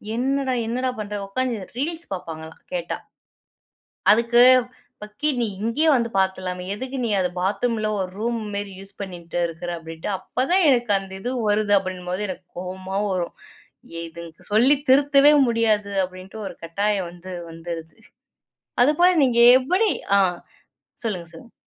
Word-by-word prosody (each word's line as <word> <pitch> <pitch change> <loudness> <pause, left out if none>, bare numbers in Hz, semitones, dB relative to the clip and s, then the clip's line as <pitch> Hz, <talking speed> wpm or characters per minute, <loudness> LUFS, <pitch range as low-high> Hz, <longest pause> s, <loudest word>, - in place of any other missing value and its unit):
என்னடா 270 +1 0
என்னடா 255 +3 -1
பண்ற. 210 0 -4
உக்காந்து 245 +3 -1 0.2
ரீல்ஸ் 330 +5 -3
பார்ப்பாங்களாம், 160 -3 -8
கேட்டா. - - -2 1.1
அதுக்கு 235 +2 +4 0.6
பக்கி 210 +8 -2
நீ - - +2 0.2
இங்கயே 230 +9 +1
வந்து 235 -2 +1
பார்த்துறலாமே, 185 -1 -1
எதுக்கு 260 +5 -5
நீ - - -1
அத 180 - +2
பாத்ரூமில 215 +4 0
ஒரு 185 -1 -2
ரூம் 235 +1 -1 0.2
மாரி 200 -1 -4
யூஸ் 195 +1 -12
பண்ணீட்டு 175 -3 -5
இருக்குற 170 +1 -6
அப்படின்ட்டு 165 +1 -7
அப்பதான் 340 - +1
எனக்கு 240 -4 +2
அந்த 195 0 -11
இது 245 +5 -3 0.2
வருது, 205 0 +2
அப்படின்னும்போது 185 +1 -4
எனக்கு 185 -1 -7
கோவமா 185 +1 -5
வரும். 180 -2 -2 0.6
ஏ - - -4
இதுங் 170 0 -9 0.2
சொல்லி 245 +7 +5
திருத்தவே 280 +1 +6 0.2
முடியாது 220 -3 +1
அப்படின்ட்டு 185 +3 -8
ஒரு - - -8
கட்டாயம் 195 +2 -1
வந்து 180 +1 -10 0.2
வந்துருது. 165 -1 -7 0.9
அதுபோல 305 +7 +5
நீங்க 245 -3 +2 0.2
எப்படி? 370 +11 +2 0.3
அ - - +5 0.9
சொல்லுங்க 180 -6 -3
சொல்லுங்க. 165 +8 -13
205 Hz, 135 wpm, -23 LUFS, 185-245 Hz, 1.1 s, திருத்தவே